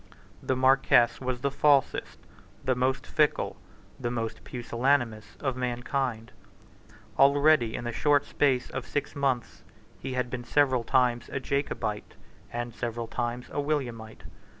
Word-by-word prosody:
The 130 - 0
Marquess 130 -2 +4
was 125 -1 -3
the 140 0 0
falsest, 140 -1 +2 0.5
the 130 - +2
most 130 +1 0
fickle, 150 -1 +1 0.4
the 120 -2 -2
most 115 -2 -4
pusillanimous, 120 -3 -1
of 135 -3 -1
mankind. 125 -1 -2 0.9
Already, 140 -3 +5
in - - -4
the 120 - -3
short 145 +4 +2
space 130 -4 +1
of 130 - -5
six 145 - -3
months, 135 -4 -1 0.4
he 130 - -5
had 125 -1 -2
been 125 -1 -4
several 130 -2 +2
times 120 -1 +1
a - - -2
Jacobite, 125 -6 -3 0.4
and 120 0 -4
several 115 0 -4
times 120 +1 -3
a - - -3
Williamite. 125 -7 -3
125 Hz, 135 wpm, -28 LUFS, 120-140 Hz, 0.9 s, Already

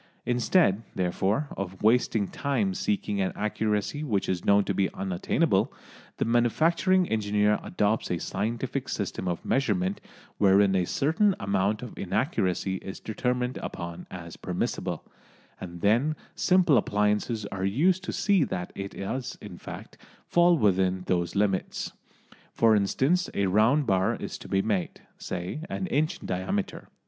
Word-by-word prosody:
Instead, 120 - +3
therefore, 95 - 0
of 95 0 -6
wasting 110 -2 +3
time 115 -9 -1
seeking 100 +1 -1
an 95 - 0
accuracy 105 +6 -1
which 105 -9 0
is 90 -2 -1
known 100 0 +4
to 100 - -1
be 95 0 +1
unattainable, 95 -2 +1 0.5
the - - 0
manufacturing 165 - +3
engineer 105 -1 +2
adopts 105 +2 0
a 90 - 0
scientific 110 +8 -3
system 95 - -3
of 90 -1 -3
measurement 100 -8 0 0.4
wherein 100 0 +5
a 90 -1 +2
certain 175 +8 +2
amount 100 +3 0
of 125 - -8
inaccuracy 95 - 0
is 95 +1 -8
determined 125 +3 -2
upon 85 0 -6
as 85 -2 -8
permissible, - - -3 0.5
and 85 -2 -8
then 120 +10 +3 0.2
simple 180 -7 +4
appliances 105 +2 0
are 95 -1 -4
used 165 - +2
to - - -3
see 200 -6 +2
that 90 -8 -4
it 100 0 -6
does, 125 +6 -4
in - - -9
fact, - - -10 0.3
fall 175 0 +4
within 95 -5 +2
those 85 -1 0
limits. 100 -2 -1 0.6
For 115 -1 +5
instance, 135 - +1
a 100 - +2
round 110 +10 +3
bar 95 -3 +2
is - - -6
to - - -10
be 95 0 +1
made, 100 -5 -2 0.2
say, 90 +10 -4
an 190 - -3
inch 155 +1 0
in - - -9
diameter. 195 - -3
105 Hz, 145 wpm, -27 LUFS, 95-130 Hz, 0.6 s, wherein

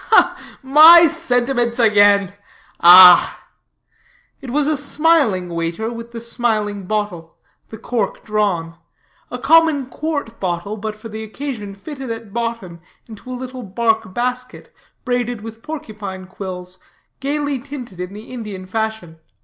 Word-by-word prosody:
"My 315 +5 +8
sentiments 245 -7 -1
again. 205 -4 +4 0.5
Ah!" 180 0 +8 1.0
It 270 - -8
was 290 +3 0
a 305 +1 +1
smiling 285 - +1
waiter, 170 +7 -3
with 230 0 -9
the 235 - -7
smiling 215 -4 -2
bottle, 205 -6 -4 0.3
the 220 - -9
cork 220 -2 -3
drawn; 190 -6 -1 0.5
a - - -5
common 320 -4 +3
quart 285 -4 -5
bottle, 180 +2 -3
but 215 0 -6
for 215 +1 -11
the 220 0 -7
occasion 220 -3 -7
fitted 270 +4 -8
at 225 -3 -7
bottom 230 -7 -4 0.3
into 225 +2 -13
a 250 - -5
little 255 0 -7
bark 220 0 -1
basket, 250 +3 -4 0.3
braided 245 -3 -2
with 225 +1 -10
porcupine 215 -11 -7
quills, 185 -1 -9 0.4
gayly 285 0 -2
tinted 250 -8 -10
in 180 +1 -6
the 215 +4 -11
Indian 210 -6 -7
fashion. 220 -5 -4
225 Hz, 130 wpm, -18 LUFS, 200-255 Hz, 1.0 s, My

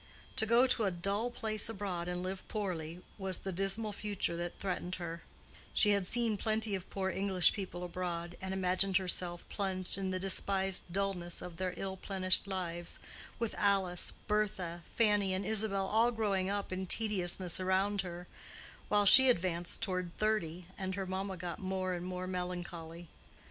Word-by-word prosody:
To 220 - +2
go 235 +3 +6
to 240 -4 +3
a - - +3
dull 200 +6 -1
place 220 -3 -1
abroad 190 -5 -3
and 180 0 -3
live 185 +1 -5
poorly, 180 -5 -4 0.2
was 190 -2 -2
the 195 - -5
dismal 195 +4 0
future 205 -4 -2
that 175 0 -4
threatened 180 -1 -3
her: 170 -1 -6 0.5
she 210 - +6
had 200 -3 +2
seen 230 -2 +1
plenty 220 +1 +1
of 190 -2 -4
poor 190 -1 -1
English 190 -1 +5
people 185 -3 -5
abroad 175 -1 -4
and 190 0 -4
imagined 190 0 +2
herself 180 -2 -2
plunged 190 -2 -1
in 190 -1 -1
the 185 - -1
despised 190 -1 +1
dullness 185 -2 -1
of 175 -2 -8
their 185 -1 -2
ill 190 -1 -3
plenished 190 0 +2
lives, 175 -3 -3 0.4
with 230 -2 -2
Alice, 195 -3 +3
Bertha, 190 -5 -1
Fanny 205 -4 +2
and 190 +1 -3
Isabel 205 -2 +1
all 220 +4 +3
growing 200 -5 0
up 200 -1 -2
in 185 0 -3
tediousness 185 -4 +2
around 190 +2 +1
her, 175 -1 -7 0.6
while 205 -1 +4
she 260 +6 +10
advanced 175 -5 0
toward 185 -2 -2
thirty 185 -6 0
and 190 -1 -2
her 195 0 -3
mamma 190 +1 -3
got 175 0 -5
more 185 -1 -2
and 175 0 -4
more 185 0 -4
melancholy. 175 -2 -5
190 Hz, 165 wpm, -33 LUFS, 180-200 Hz, 0.6 s, she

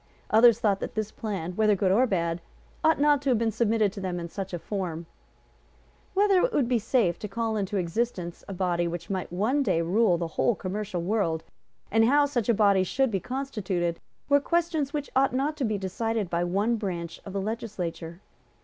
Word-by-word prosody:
Others 230 +1 +6
thought 205 -5 +2
that - - -5
this 215 -1 -2
plan, 195 -6 -4
whether 215 0 +3
good 190 -1 +1
or 245 +7 +4
bad, 170 -4 -1 0.4
ought 320 -1 +4
not 290 -1 +4
to 280 - -1
have 245 - +4
been 225 0 +1
submitted 220 -2 +1
to 200 - -7
them 180 -2 -3
in 170 - -5
such 195 +2 -5
a 175 - -2
form. 170 -3 -4 1.1
Whether 395 -1 +4
it - - +2
would 270 -5 +2
be 245 -1 +2
safe 215 -6 +1
to 210 - -5
call 225 +2 -2
into 200 -1 -1
existence 180 -1 -2
a 195 - -5
body 175 -2 0
which 170 +2 -5
might 185 -3 -3
one 220 +11 +1
day 190 -10 +1
rule 185 +1 +3
the 170 - -2
whole 220 +7 +1
commercial 195 -2 -4
world, 170 -5 0 0.5
and 225 +1 +4
how 285 +4 +4
such 245 -6 -2
a - - +6
body 200 -2 +4
should 260 +6 0
be 195 - 0
constituted, 190 -8 -2 0.3
were 285 0 +5
questions 320 -2 0
which 290 -1 -4
ought 265 -1 +3
not 285 +4 0
to 285 - -2
be 215 -2 0
decided 205 +1 -2
by 170 0 +1
one 200 +7 +1
branch 175 -5 -5
of 195 - -8
the 200 - -1
Legislature. 185 -5 -5
210 Hz, 205 wpm, -27 LUFS, 180-240 Hz, 1.1 s, Others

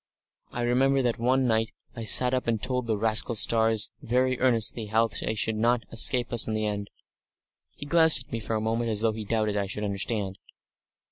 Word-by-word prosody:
I 120 - -4
remember 135 +3 +2
that 120 -2 -1
one 130 +2 +1
night 115 -1 0 0.2
I 115 -2 -6
sat 125 +3 +4
up 130 -2 -2
and 115 -2 0
told 125 +1 -2
the 110 -2 0
rascal 110 +2 +2
stars 110 0 +1
very 130 +1 0
earnestly 115 -3 0
how 110 +2 +2
they 110 +1 -4
should 110 +1 -1
not 120 +1 +1
escape 120 +2 +2
us 120 - +3
in 110 - -2
the 110 0 -2
end." 105 -1 -4 0.9
He - - -8
glanced 160 -3 +4
at - - -29
me 115 - -3
for 110 0 -4
a 110 - -1
moment 115 +1 -2
as 105 -1 0
though 110 -1 +1
he 110 -1 -7
doubted 110 -1 -1
I 100 -1 -1
should 105 +2 -5
understand. 100 -1 -3
115 Hz, 205 wpm, -26 LUFS, 110-125 Hz, 0.9 s, sat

